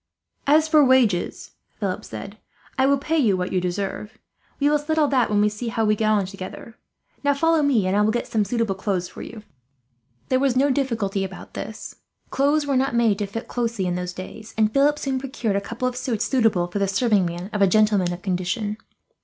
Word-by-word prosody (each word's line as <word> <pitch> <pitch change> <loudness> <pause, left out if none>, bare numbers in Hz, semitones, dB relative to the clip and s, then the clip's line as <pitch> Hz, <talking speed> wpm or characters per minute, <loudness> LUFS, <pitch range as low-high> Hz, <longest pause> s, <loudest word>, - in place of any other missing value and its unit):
"As 305 +2 +5
for 310 -2 +5
wages," 250 -9 +2 0.3
Philip - - -2
said, - - -8 0.4
"I 265 0 +3
will 280 0 +4
pay 315 +4 0
you 210 -9 +3
what 180 +1 -3
you 185 - +1
deserve. 195 +4 -4 0.4
We 285 - +3
will 300 0 +3
settle 310 +1 +1
that 255 -4 +2
when 205 -1 +2
we 210 - +4
see 210 +3 -4
how 225 -1 0
we 215 0 +3
get 215 0 0
on 210 -3 +2
together. 195 +4 -9 0.5
Now 285 0 +3
follow 325 +2 +3
me, 265 -9 +2
and 185 +1 +1
I 205 - +3
will 210 - +3
get 240 +2 -1
some 215 -2 0
suitable 225 0 -1
clothes 190 -2 -2
for - - -11
you." 220 -2 -9 0.9
There 255 - +3
was 265 -2 +1
no 275 +2 +3
difficulty 225 -8 -1
about 190 -1 -8
this. 220 - -7 0.3
Clothes 290 +2 +2
were 280 -1 0
not 260 -1 +1
made 225 -4 +2
to 205 - -1
fit 225 +4 -6
closely 235 -5 -2
in 180 - 0
those 180 0 -3
days, 215 +4 -9
and 215 -1 +2
Philip 290 +2 +3
soon 270 -3 -2
procured 255 -6 -2
a 200 - +1
couple 230 +5 -3
of 250 - -3
suits 250 -4 -2
suitable 225 -9 +2
for 175 +3 -4
the 200 - +1
serving 200 -2 +2
man 175 +4 -6
of 210 - -1
a 195 - +6
gentleman 205 -3 +3
of 175 +1 -7
condition. 195 +3 -2
220 Hz, 220 wpm, -23 LUFS, 195-265 Hz, 0.9 s, a